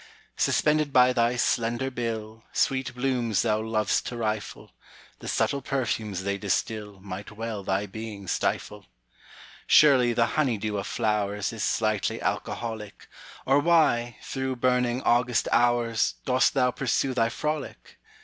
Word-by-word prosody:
Suspended 150 Hz, -1 st, +2 dB
by 125 Hz, -1 st, +5 dB
thy 120 Hz, 0 st, +2 dB
slender 120 Hz, +2 st, 0 dB
bill, 115 Hz, -2 st, -5 dB
Sweet 130 Hz, -2 st, 0 dB
blooms 125 Hz, -5 st, 0 dB
thou 110 Hz, -2 st, +1 dB
lov'st 110 Hz, -1 st, 0 dB
to 120 Hz, -, -5 dB
rifle; 110 Hz, -2 st, -4 dB, 0.5 s
The -, -, -9 dB
subtle 140 Hz, -, 0 dB
perfumes 110 Hz, -8 st, -2 dB
they 100 Hz, 0 st, -2 dB
distilMight 100 Hz, -1 st, -3 dB
well 110 Hz, -1 st, -5 dB
thy 95 Hz, +2 st, -1 dB
being 105 Hz, -1 st, -8 dB
stifle. -, -, -2 dB, 0.8 s
Surely 130 Hz, -5 st, +6 dB
the 115 Hz, 0 st, +3 dB, 0.2 s
honey 125 Hz, -7 st, +1 dB
dew 105 Hz, 0 st, -2 dB
of 100 Hz, -, -5 dB
flowersIs 105 Hz, 0 st, -1 dB
slightly 110 Hz, -1 st, 0 dB
alcoholic, 110 Hz, -3 st, -4 dB, 0.4 s
Or 135 Hz, +2 st, +4 dB
why, 145 Hz, -8 st, +2 dB
through 130 Hz, -1 st, -3 dB
burning 125 Hz, 0 st, +1 dB
August 120 Hz, 0 st, +2 dB
hours, 120 Hz, -2 st, +2 dB
Dost 130 Hz, +1 st, +2 dB
thou 125 Hz, -2 st, +3 dB
pursue 130 Hz, +1 st, 0 dB
thy 115 Hz, -2 st, +2 dB
frolic? 150 Hz, +5 st, -5 dB
115 Hz, 130 wpm, -26 LUFS, 105-125 Hz, 0.8 s, Surely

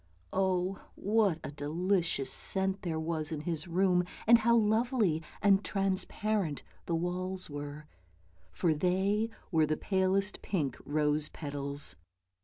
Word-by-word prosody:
Oh, 190 Hz, 0 st, +1 dB, 0.2 s
what 205 Hz, -4 st, +2 dB
a -, -, -5 dB
delicious 165 Hz, +1 st, 0 dB
scent 190 Hz, 0 st, +1 dB
there 165 Hz, -3 st, -2 dB
was 160 Hz, -1 st, -2 dB
in 155 Hz, -2 st, -3 dB
his 160 Hz, 0 st, -3 dB
room, 180 Hz, +1 st, +3 dB, 0.2 s
and 235 Hz, +1 st, +7 dB
how 235 Hz, +1 st, +4 dB
lovely 220 Hz, -, +2 dB, 0.2 s
and 200 Hz, 0 st, +5 dB
transparent 195 Hz, -3 st, -1 dB, 0.2 s
the 170 Hz, -, +1 dB
walls 180 Hz, +1 st, -3 dB
were, 145 Hz, +1 st, -6 dB, 0.7 s
for 170 Hz, -3 st, +1 dB
they 190 Hz, +7 st, +1 dB, 0.2 s
were 160 Hz, -3 st, +3 dB
palest 190 Hz, +5 st, 0 dB
pink 155 Hz, -9 st, -1 dB
rose 150 Hz, 0 st, +1 dB
petals. 140 Hz, -1 st, -4 dB
180 Hz, 120 wpm, -31 LUFS, 155-195 Hz, 0.7 s, and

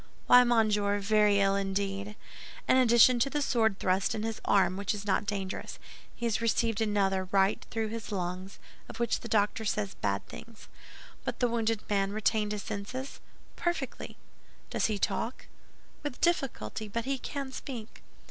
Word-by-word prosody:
"Why, 250 Hz, 0 st, +8 dB
monsieur, 210 Hz, -4 st, +2 dB
very 205 Hz, 0 st, +3 dB
ill 195 Hz, 0 st, +3 dB
indeed! 200 Hz, +1 st, -2 dB, 0.5 s
In -, -, +5 dB
addition 240 Hz, 0 st, +6 dB
to 275 Hz, -, +2 dB
the 295 Hz, -, -1 dB
sword 225 Hz, -7 st, +2 dB
thrust 185 Hz, +1 st, +1 dB
in 215 Hz, -, -3 dB
his 225 Hz, -1 st, -3 dB
arm, 190 Hz, -2 st, +3 dB
which 200 Hz, +2 st, -1 dB
is 205 Hz, 0 st, -7 dB
not 205 Hz, 0 st, +1 dB
dangerous, 195 Hz, -2 st, -4 dB, 0.4 s
he 235 Hz, -, -4 dB
has 225 Hz, -1 st, 0 dB
received 230 Hz, -1 st, +1 dB
another 195 Hz, -3 st, +1 dB
right 195 Hz, +1 st, +2 dB
through 220 Hz, -1 st, -2 dB
his 225 Hz, -1 st, -6 dB
lungs, 185 Hz, 0 st, -4 dB, 0.3 s
of -, -, -9 dB
which 235 Hz, -, +1 dB
the -, -, -8 dB
doctor 215 Hz, 0 st, +1 dB
says 205 Hz, -2 st, -1 dB
bad 100 Hz, -1 st, -2 dB
things." 230 Hz, -2 st, -12 dB, 0.6 s
"But -, -, -3 dB
has -, -, -31 dB
the 245 Hz, -, +3 dB
wounded 225 Hz, -2 st, -1 dB
man 200 Hz, -1 st, 0 dB
retained 215 Hz, -1 st, +1 dB
his 210 Hz, -1 st, -3 dB
senses?" 255 Hz, +7 st, -5 dB, 0.4 s
"Perfectly." 345 Hz, 0 st, -3 dB, 0.5 s
"Does -, -, +1 dB
he 215 Hz, -2 st, -1 dB
talk?" 230 Hz, +4 st, -2 dB, 0.6 s
"With 290 Hz, -4 st, -5 dB
difficulty, 245 Hz, -, -1 dB
but 230 Hz, +3 st, -3 dB
he 270 Hz, 0 st, -1 dB
can 275 Hz, +1 st, -5 dB
speak." 245 Hz, -5 st, -8 dB
215 Hz, 165 wpm, -30 LUFS, 200-235 Hz, 0.6 s, Why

